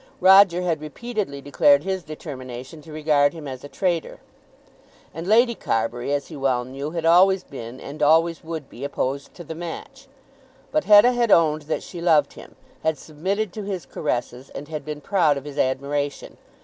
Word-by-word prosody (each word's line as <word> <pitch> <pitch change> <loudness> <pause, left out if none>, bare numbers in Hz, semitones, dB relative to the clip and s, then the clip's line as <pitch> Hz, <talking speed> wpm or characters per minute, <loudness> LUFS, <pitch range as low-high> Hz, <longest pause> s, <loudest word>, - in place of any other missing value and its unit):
Roger 190 -1 +6
had 165 -4 -1
repeatedly 190 -2 -5
declared 285 - +4
his 190 -1 -2
determination 135 -2 -8
to 160 - -13
regard 150 -2 +2
him 160 -3 -8
as 130 -1 -7
a 145 - -9
traitor. 175 -2 -2 0.9
And 165 +3 -6
Lady 235 +3 +4
Carbury, 120 - -2
as 145 -1 0
he 160 - -10
well 130 -3 0
knew, 135 +3 -5
had 165 0 -4
always 185 +3 +5
been 125 -2 -9
and 150 +2 -9
always 165 +3 +3
would 160 -4 -6
be 125 - -11
opposed 140 0 -3
to 175 - -9
the 160 - -7
match. 175 - -8 0.6
But 305 0 0
Hetta 210 +4 +7
had 240 -2 +1
owned 155 -4 +4
that - - -1
she 175 - -8
loved 155 -5 +3
him, - - -13 0.3
had 160 -1 0
submitted 185 +8 -3
to 215 - -5
his 195 -3 -5
caresses, 125 -3 -4
and 145 - -8
had 155 -2 -5
been 150 -1 -6
proud 165 -5 +2
of 140 - -7
his 145 -1 -7
admiration. 140 +2 -2
155 Hz, 180 wpm, -23 LUFS, 140-185 Hz, 0.9 s, Hetta